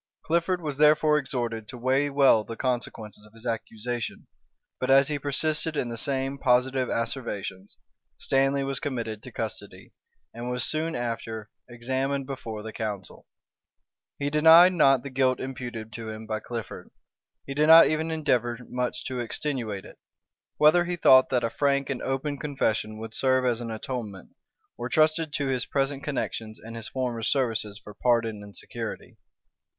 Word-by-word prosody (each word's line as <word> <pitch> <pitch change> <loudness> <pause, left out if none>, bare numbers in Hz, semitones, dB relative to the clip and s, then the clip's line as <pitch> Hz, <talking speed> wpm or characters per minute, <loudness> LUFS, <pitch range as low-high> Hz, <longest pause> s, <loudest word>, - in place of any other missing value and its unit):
Clifford 170 +2 0
was 150 -4 -4
therefore 150 0 +5
exhorted 120 -5 -3
to 125 - -8
weigh 135 +4 +1
well 135 -6 +5
the 115 - -7
consequences 115 -4 -3
of 105 0 -18
his 115 +1 -15
accusation; 115 0 -4 0.5
but 130 - -2
as 135 +1 +6
he 150 -1 -1
persisted 150 +2 -1
in 125 - -1
the 115 - -4
same 135 +2 -1
positive 130 0 +2
asseverations, 115 -5 -4 0.4
Stanley 135 +1 +1
was 135 -1 -2
committed 115 -6 -4
to 125 - -11
custody, 100 -4 -7 0.4
and 120 +2 -5
was 125 -1 0
soon 160 +1 0
after 115 -2 -4 0.2
examined 130 +3 -2
before 115 -6 -6
the 110 0 -7
council.[*] 105 -4 -5 0.9
He 145 0 -2
denied 165 +4 +8
not 135 -7 +4
the 140 - -7
guilt 130 -1 +2
imputed 120 -4 -6
to 115 -1 -6
him 110 0 -7
by 110 0 -2
Clifford; 115 -2 -7 0.6
he 135 - -5
did 150 +2 +2
not 165 +1 +10
even 160 +1 0
endeavor 125 -7 0
much 125 0 -2
to 130 -1 -3
extenuate 120 -5 -3
it; - - -14 0.6
whether 155 +4 +5
he 175 0 -2
thought 130 -6 +6
that 125 -2 +1
a 115 - 0
frank 140 0 +1
and 130 - -3
open 135 +2 -2
confession 110 -7 -1
would 110 0 -7
serve 130 0 +2
as 120 -1 +1
an 115 - -5
atonement, 110 -4 -6 0.5
or 120 +1 -3
trusted 155 +2 +2
to 140 +1 -1
his 130 -2 -1
present 140 0 -1
connections 110 -6 -4
and 115 +1 -10
his 115 -1 -6
former 125 -3 -2
services 110 -5 0
for 105 - -10
pardon 115 -2 +1
and 100 -1 -11
security. - - -7
130 Hz, 165 wpm, -26 LUFS, 115-140 Hz, 0.9 s, not